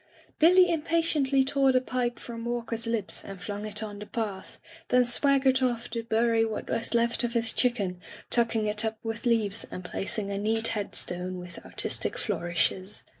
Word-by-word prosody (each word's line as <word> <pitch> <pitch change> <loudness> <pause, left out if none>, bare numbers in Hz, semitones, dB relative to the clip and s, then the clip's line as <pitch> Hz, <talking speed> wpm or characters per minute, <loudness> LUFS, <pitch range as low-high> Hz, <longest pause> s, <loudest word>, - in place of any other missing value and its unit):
Billy 360 +2 +6
impatiently 310 -4 +1
tore 270 0 +2
the 255 - +4
pipe 250 -1 -2
from 230 -1 -8
Walk 240 -1 -3
er's 230 0 -2
lips 225 -4 -2
and 195 -1 -9
flung 205 +3 -5
it 210 +1 -2
on 205 -1 -7
the 210 - -8
path, 205 -5 -5 0.3
then 250 0 +4
swag 275 +3 +3
gered 265 -1 +3
off 240 -2 -1
to 230 0 -2
bury 230 0 +2
what 220 -1 -4
was 230 +1 0
left 235 +1 +1
of 235 -1 -1
his 230 -1 +1
chicken, 200 -8 0 0.3
tucking 230 -2 +3
it 210 0 +1
up 220 0 -2
with 225 +2 -4
leaves 225 -3 +1
and 185 - -7
placing 200 +2 -3
a 200 - -2
neat 225 +2 +2
headstone 185 -3 -3
with 180 0 -10
artistic - - +2
flourishes. 185 0 -1
230 Hz, 180 wpm, -27 LUFS, 205-250 Hz, 0.3 s, Billy